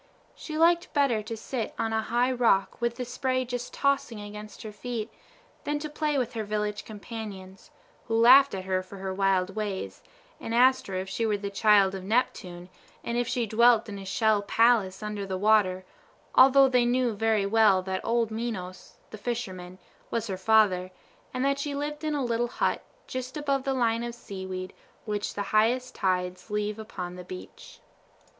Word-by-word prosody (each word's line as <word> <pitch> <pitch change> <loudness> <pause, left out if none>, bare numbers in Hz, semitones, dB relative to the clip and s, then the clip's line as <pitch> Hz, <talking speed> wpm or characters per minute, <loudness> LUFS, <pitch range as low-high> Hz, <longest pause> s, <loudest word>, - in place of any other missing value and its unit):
She 310 -1 -7
liked 340 +2 +3
better 275 -7 +2
to 220 +1 -6
sit 230 0 -4
on 225 0 -1
a 220 - +1
high 240 +3 +1
rock 235 -6 +1
with 235 0 0
the 250 - -4
spray 255 +1 -1
just 245 0 -5
tossing 275 -5 0
against 210 +1 -9
her 215 - -7
feet, 225 +1 -5 0.5
than 295 0 -1
to 300 0 -6
play 300 -1 -1
with 250 -2 -1
her 225 -2 -3
village 210 0 -3
companions, 210 0 -9 0.4
who 225 -1 0
laughed 260 +2 +7
at 185 -1 -6
her 185 -1 0
for 185 +2 -12
her 190 0 -4
wild 195 -1 +1
ways, 205 -3 -4 0.4
and 225 - -4
asked 260 +2 +4
her 190 - -5
if 185 +1 -3
she 195 +4 -3
were 215 -2 +1
the 200 0 -5
child 200 -1 +4
of 190 -1 -6
Neptune, 185 -5 -1 0.4
and 235 - -3
if 240 0 0
she 250 -2 0
dwelt 230 +1 +4
in 200 -2 -7
a 195 - -9
shell 215 +1 +2
palace 215 -3 +2
under 210 -1 -4
the 190 -1 -3
water; 190 -2 +3 0.5
although 270 +1 +7
they 250 -2 +3
knew 245 -1 +1
very 215 -1 +1
well 200 -3 +4
that 190 0 -3
old 230 -1 0
Menos, 220 -5 -5 0.2
the 215 - -9
fisherman, 185 -6 -5 0.3
was 230 -1 -2
her 195 -4 -3
father, 190 -2 +3 0.4
and 255 +1 -1
that 275 0 +1
she 285 0 -3
lived 295 +2 -4
in 305 -1 -1
a 280 -3 -1
little 240 0 0
hut, - - -1 0.2
just 255 +2 -5
above 275 -3 -1
the 270 - +1
line 230 -2 +1
of 240 0 -5
seaweed 190 -4 -7 0.3
which 210 -1 -3
the 205 - -2
highest 240 +4 +2
tides 180 0 -2
leave 210 +1 -2
upon 180 -5 -6
the 180 - -8
beach. 180 0 -11
220 Hz, 185 wpm, -27 LUFS, 195-245 Hz, 0.5 s, laughed